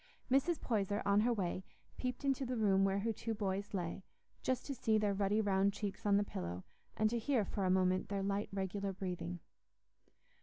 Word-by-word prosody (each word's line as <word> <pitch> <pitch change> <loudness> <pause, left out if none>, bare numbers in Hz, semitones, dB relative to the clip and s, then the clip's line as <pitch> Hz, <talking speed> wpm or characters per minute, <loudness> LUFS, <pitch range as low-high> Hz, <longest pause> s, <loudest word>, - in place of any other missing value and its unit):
Mrs. 275 +5 +3
Poyser, 205 -3 0
on 200 0 +4
her 235 +3 +3
way, 190 -4 -1 0.3
peeped 250 +2 -3
into 270 -1 +1
the 250 -1 -2
room 195 -3 +4
where 195 0 +2
her 225 +2 0
two 225 +1 -3
boys 200 0 -2
lay; 180 -1 -3 0.4
just 255 -1 -1
to 280 - -3
see 225 -4 +2
their 210 -1 +2
ruddy 200 +2 +2
round 200 -1 +2
cheeks 205 0 -4
on 200 -1 +5
the 205 - +3
pillow, 90 - -5 0.3
and 215 - +4
to 235 - 0
hear 235 -3 +1
for 195 +1 -2
a - - +2
moment 185 0 +2
their 200 -1 -1
light 200 +1 -1
regular 195 0 -2
breathing. 180 - -4
200 Hz, 195 wpm, -36 LUFS, 190-225 Hz, 0.4 s, on